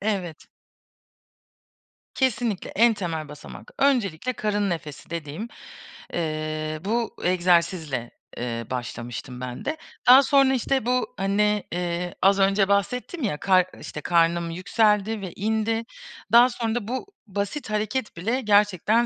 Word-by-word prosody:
Evet. 190 -6 -3 1.7
Kesinlikle 240 -6 0
en 230 +2 +5
temel 165 -6 -4
basamak. 150 0 -11
Öncelikle 255 - +1
karın 205 -3 0
nefesi 155 -4 -6
dediğim, 165 +5 -5 0.7
eee, 155 -1 -2
bu 230 +2 -1
egzersizle, 170 -7 +1 0.3
eee, 115 -1 -3
başlamıştım 120 +1 -5
ben 125 -1 -6
de. 310 +2 -2 0.3
Daha 260 +3 +9
sonra 275 -1 +4
işte 265 -1 0
bu 250 +1 0
hani, 205 +2 +1
eee, 175 0 -2
az 195 +1 +4
önce 195 0 +3
bahsettim 250 - -1
ya, 195 -10 0
kar 185 0 +4 0.2
işte, 150 - -7
karnım 170 +1 +2
yükseldi 210 +4 +1
ve 185 -3 -6
indi. 220 +2 0 0.5
Daha 240 +2 +8
sonra 230 -2 -2
da 225 -3 -3
bu 255 +2 -3 0.2
basit 205 +7 -3
hareket 215 +1 -2
bile 225 +10 -1
gerçekten 210 +1 +3
200 Hz, 125 wpm, -25 LUFS, 165-225 Hz, 1.7 s, Daha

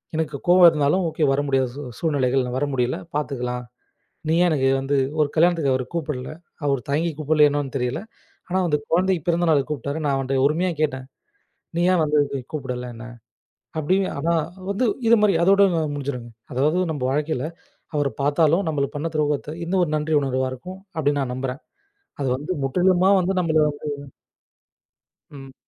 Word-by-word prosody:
எனக்குக் 150 -3 -3
கோவம் 180 0 +8
இருந்தாலும் 150 +4 +1
ஓகே 160 - -2
வர 140 - +1
முடியாத 135 +1 -1
சூழ்நிலைகள். 135 -5 +1
நான் 125 +1 -3
வர 145 - +1
முடியல 125 -1 0 0.2
பாத்துக்கலாம். 125 -4 -2 0.7
நீ 160 - +3
ஏன் - - +4
எனக்கு 135 -4 +2
வந்து 135 +1 0 0.2
1 150 - +3
கல்யாணத்துக்கு 165 -4 +3
அவர் 130 0 -1
கூப்பிடல? 150 -6 -3 0.4
அவர் 140 -2 +1
தயங்கி 155 +4 +1
கூப்பிடல 155 0 +4
என்னன்னு 145 -1 -3
தெரியல. 125 -1 -1 0.5
ஆனா 185 - 0
அந்தக் 150 -2 -1
குழந்தை 185 +2 +3
பிறந்தநாளுக்கு 165 -5 +2
கூப்பிட்டாரு. 140 +1 -3
நான் 140 -1 +2
அவன்ட்ட 135 0 -1
உரிமையா 170 +5 +1
கேட்டேன். 130 -4 -1 0.7
"நீ 170 - +1
ஏன் 175 - +3
வந்து 150 0 +2 0.3
கூப்பிடல 125 -4 -4
என்ன" 115 +1 -9 0.7
அப்டின்னு. 185 +5 +1
ஆனா 165 +4 +1 0.4
வந்து 205 +6 0 0.2
இது 230 - +7
மாரி 205 -3 +4
அதோட 195 +3 +5 0.3
முடிஞ்சிருங்க. 130 -4 -5 0.2
அதாவது 150 +8 +2
நம்ப 145 -5 -4
வாழ்க்கையில 150 -2 -1 0.5
அவர 145 -1 +2
பார்த்தாலும் 155 +6 +3
நம்மளுக்கு 140 -2 -2
பண்ண 155 +3 -2
துரோகத்த 150 -1 0 0.2
இந்த 175 - -4
1 170 - -1
நன்றி 155 +1 0
உணர்வா 130 -1 -1
இருக்கும் 185 +9 -9 0.2
அப்டின்னு 145 -2 +1
நான் 125 -1 -4
நம்புறேன். 130 +1 -4 0.6
அது 135 - 0
வந்து 150 +7 -4
முற்றிலுமா 180 +6 +3
வந்து 185 +2 0
நம்மள 160 -3 +1
வந்து 145 -1 -6 1.5
ம். 135 -2 -11
145 Hz, 160 wpm, -23 LUFS, 135-165 Hz, 1.5 s, கோவம்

